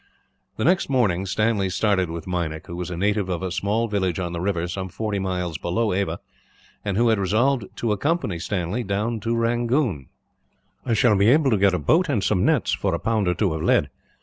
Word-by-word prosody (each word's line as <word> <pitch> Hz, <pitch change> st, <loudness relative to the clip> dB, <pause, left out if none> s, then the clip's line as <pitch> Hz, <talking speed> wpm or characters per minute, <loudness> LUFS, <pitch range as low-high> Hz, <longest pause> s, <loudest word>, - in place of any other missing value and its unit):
The -, -, -1 dB
next 180 Hz, 0 st, +2 dB
morning 100 Hz, -8 st, +1 dB
Stanley 105 Hz, -1 st, +1 dB
started 95 Hz, -2 st, +1 dB
with 85 Hz, -1 st, -6 dB
Meinik, 85 Hz, -4 st, -3 dB
who 85 Hz, -, -7 dB
was 90 Hz, 0 st, -4 dB
a 90 Hz, -, -5 dB
native 100 Hz, +1 st, 0 dB
of 90 Hz, 0 st, -2 dB
a 95 Hz, -, -3 dB
small 100 Hz, +5 st, 0 dB
village 95 Hz, -5 st, -1 dB
on 85 Hz, -2 st, -3 dB
the 85 Hz, -, -3 dB
river, 90 Hz, -3 st, -1 dB
some 95 Hz, +1 st, -4 dB
forty 100 Hz, +3 st, -3 dB
miles 90 Hz, -4 st, -3 dB
below 105 Hz, +4 st, 0 dB
Ava, 90 Hz, -3 st, -1 dB, 0.6 s
and 100 Hz, -2 st, -2 dB
who 120 Hz, +1 st, +3 dB
had 110 Hz, -2 st, +2 dB
resolved 110 Hz, +5 st, +1 dB
to 115 Hz, -, -1 dB
accompany 105 Hz, -, -1 dB
him 95 Hz, +5 st, -3 dB
down 105 Hz, +4 st, -1 dB
to 115 Hz, +2 st, -1 dB
Rangoon. 115 Hz, -, 0 dB, 0.8 s
"I 115 Hz, -, +2 dB
shall 115 Hz, -3 st, +4 dB
be 100 Hz, +1 st, +3 dB
able 140 Hz, 0 st, +4 dB
to 110 Hz, -, +3 dB
get 95 Hz, -1 st, +3 dB
a -, -, +1 dB
boat 165 Hz, -, +2 dB
and 110 Hz, -9 st, 0 dB
some 95 Hz, -1 st, +1 dB
nets, -, -, +2 dB
for -, -, 0 dB
a -, -, -3 dB
pound 110 Hz, -4 st, 0 dB
or 90 Hz, -, +1 dB
two 95 Hz, -3 st, 0 dB
of 80 Hz, -, -4 dB
lead. -, -, +2 dB
100 Hz, 215 wpm, -23 LUFS, 90-115 Hz, 0.8 s, shall